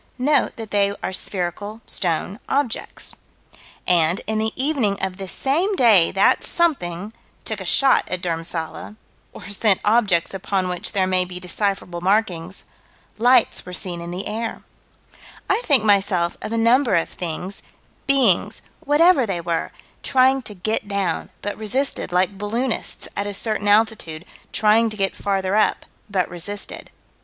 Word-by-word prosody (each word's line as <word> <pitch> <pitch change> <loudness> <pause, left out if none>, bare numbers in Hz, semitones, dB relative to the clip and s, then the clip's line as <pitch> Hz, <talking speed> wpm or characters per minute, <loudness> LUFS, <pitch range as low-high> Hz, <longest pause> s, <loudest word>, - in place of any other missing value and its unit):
Note 285 +3 +2
that 225 -2 -8
they 200 -1 +2
are - - -2
spherical 195 +3 -4
stone 180 +3 -2
objects. 275 -4 0 0.7
And, 170 0 +3
in 220 +1 -1
the 220 0 0
evening 260 -8 0
of 190 -1 -3
this 190 -3 -6
same 340 +10 0
day 220 - +5
that 195 - +3
something 210 - -1 0.3
took 215 -3 -4
a - - -6
shot 270 +8 +3
at 185 - -2
Dhurmsalla 165 +2 -4 0.4
or 200 -1 -11
sent 205 -1 +2
objects 205 -7 +2
upon 190 -1 -1
which 180 +3 -4
there 195 -2 +2
may 185 -1 +2
be 180 0 -7
decipherable 180 -1 -3
markings 185 -2 0 0.6
lights 245 +1 +4
were 180 - -9
seen 180 -2 -3
in 170 - -6
the 180 +3 -5
air 225 +1 -4 0.8
I - - +2
think, 270 -7 +5
myself, 195 -4 +2
of - - -5
a 230 - -1
number 235 0 +3
of 165 - +1
things, 180 +3 -5 0.5
beings, 230 -7 +3 0.2
whatever 295 -2 +4
they 185 -3 -2
were, 170 -1 -2 0.3
trying 265 +1 +3
to 210 - -9
get 210 +3 -2
down, 200 -4 -2
but 205 - -3
resisted, 235 0 -1
like 185 +2 +1
balloonists, 230 +4 -2
at 200 - -2
a 205 - -3
certain 215 -1 -1
altitude, 205 -6 +1 0.3
trying 220 +2 +3
to 215 - 0
get 195 -1 0
farther 195 -1 -1
up, 215 - +2 0.2
but 190 -3 0
resisted. 190 +4 -4
200 Hz, 150 wpm, -22 LUFS, 180-225 Hz, 0.8 s, day